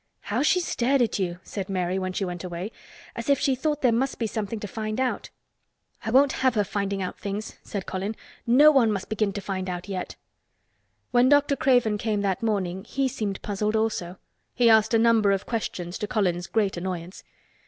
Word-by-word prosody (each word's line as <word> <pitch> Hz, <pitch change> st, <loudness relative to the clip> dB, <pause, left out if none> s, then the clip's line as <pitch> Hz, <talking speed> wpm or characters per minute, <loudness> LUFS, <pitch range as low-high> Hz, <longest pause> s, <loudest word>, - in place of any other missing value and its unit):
"How 220 Hz, +5 st, -1 dB
she 335 Hz, +5 st, +3 dB
stared 270 Hz, -6 st, +1 dB
at 225 Hz, -, -1 dB
you!" 175 Hz, -2 st, -1 dB
said 195 Hz, -2 st, -5 dB
Mary 185 Hz, 0 st, -1 dB
when 185 Hz, 0 st, -2 dB
she 195 Hz, +1 st, -2 dB
went 175 Hz, -1 st, -5 dB
away. 180 Hz, +3 st, -5 dB, 0.4 s
"As 235 Hz, +3 st, -5 dB
if 280 Hz, -, +5 dB
she 270 Hz, -, +1 dB
thought 295 Hz, +3 st, -1 dB
there 250 Hz, -, +5 dB
must 260 Hz, +4 st, 0 dB
be 230 Hz, -, -1 dB
something 215 Hz, 0 st, -3 dB
to 205 Hz, -, -5 dB
find 215 Hz, +3 st, -4 dB
out." 260 Hz, -1 st, -1 dB, 0.7 s
"I -, -, -3 dB
won't 270 Hz, +4 st, +5 dB
have 260 Hz, -2 st, +3 dB
her 210 Hz, -, +3 dB
finding 200 Hz, -1 st, -2 dB
out 180 Hz, -, -5 dB
things," 205 Hz, +2 st, -5 dB
said 200 Hz, -3 st, -5 dB
Colin. 195 Hz, +4 st, -3 dB, 0.3 s
"No 285 Hz, +6 st, +7 dB
one 250 Hz, -7 st, +4 dB
must 195 Hz, -2 st, -3 dB
begin 215 Hz, -1 st, 0 dB
to 205 Hz, -, -4 dB
find 190 Hz, -1 st, -3 dB
out 180 Hz, +1 st, -5 dB
yet." 190 Hz, -2 st, -4 dB, 1.0 s
When 245 Hz, +1 st, +5 dB
Dr. 290 Hz, 0 st, +4 dB
Craven 245 Hz, -6 st, +2 dB
came 215 Hz, -2 st, 0 dB
that 195 Hz, -2 st, -1 dB
morning 190 Hz, -4 st, -1 dB
he 270 Hz, +4 st, -1 dB
seemed 210 Hz, -6 st, -4 dB
puzzled, 210 Hz, +1 st, -1 dB
also. 205 Hz, -5 st, -1 dB, 0.4 s
He 235 Hz, -2 st, +5 dB
asked 220 Hz, +1 st, +4 dB
a -, -, +6 dB
number 225 Hz, -3 st, +4 dB
of 195 Hz, -, -2 dB
questions, 185 Hz, -6 st, -4 dB
to 210 Hz, -, -2 dB
Colin's 180 Hz, -6 st, 0 dB
great 205 Hz, -5 st, 0 dB
annoyance. 180 Hz, 0 st, -5 dB
210 Hz, 200 wpm, -25 LUFS, 190-235 Hz, 1.0 s, No